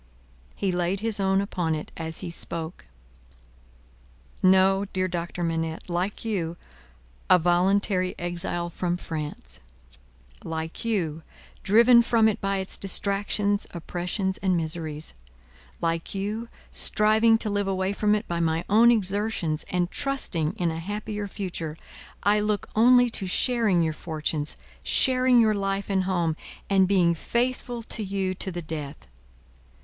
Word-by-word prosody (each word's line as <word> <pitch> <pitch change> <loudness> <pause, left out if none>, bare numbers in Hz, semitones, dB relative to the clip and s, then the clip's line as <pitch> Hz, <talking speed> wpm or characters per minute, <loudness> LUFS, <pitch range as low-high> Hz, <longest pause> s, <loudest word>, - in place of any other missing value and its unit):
He 195 - -1
laid 180 +2 -1
his 220 -2 0
own 195 0 +2
upon 175 -5 -1
it 155 - -6
as 160 -1 -4
he 170 - -5
spoke. 165 0 -5 1.5
"No, 190 +1 +4
dear 185 0 +1
Doctor 175 0 -4
Manette. 165 -1 -2
Like 185 +6 -2
you, 175 -6 -2 0.7
a 185 - +8
voluntary 185 +2 +2
exile 175 0 -1
from 175 0 -2
France; 155 -4 -4 0.8
like 160 0 -5
you, 175 -9 -1 0.4
driven 235 +4 +6
from 230 -1 +3
it 215 - -1
by 195 0 0
its 190 0 0
distractions, 200 +1 +1
oppressions, 180 +3 -3
and 185 -2 +1
miseries; 160 -1 -3 0.7
like 165 +2 -2
you, 210 +4 -3 0.2
striving 220 +2 +4
to 220 -1 -3
live 205 -1 0
away 190 0 0
from 210 +1 +2
it 210 +2 -3
by 170 -1 -2
my 165 0 0
own 225 +4 +6
exertions, 200 -7 0
and 180 -1 0
trusting 205 - -1
in 175 -3 -1
a 160 - -4
happier 205 +3 -4
future; 175 -6 -5 0.5
I 205 +1 +4
look 210 -1 -1
only 245 +2 +6
to 195 -4 -3
sharing 215 -3 +2
your 160 -1 0
fortunes, 155 -2 -3 0.2
sharing 255 -2 +4
your 220 -2 +4
life 195 0 -2
and 190 -1 +1
home, 175 -4 0 0.4
and 190 -1 +5
being 180 -3 +3
faithful 240 +5 -2
to 220 - -5
you 190 -1 -1
to 190 +1 -4
the 175 -1 -5
death. 150 -2 -6
190 Hz, 140 wpm, -26 LUFS, 170-210 Hz, 1.5 s, a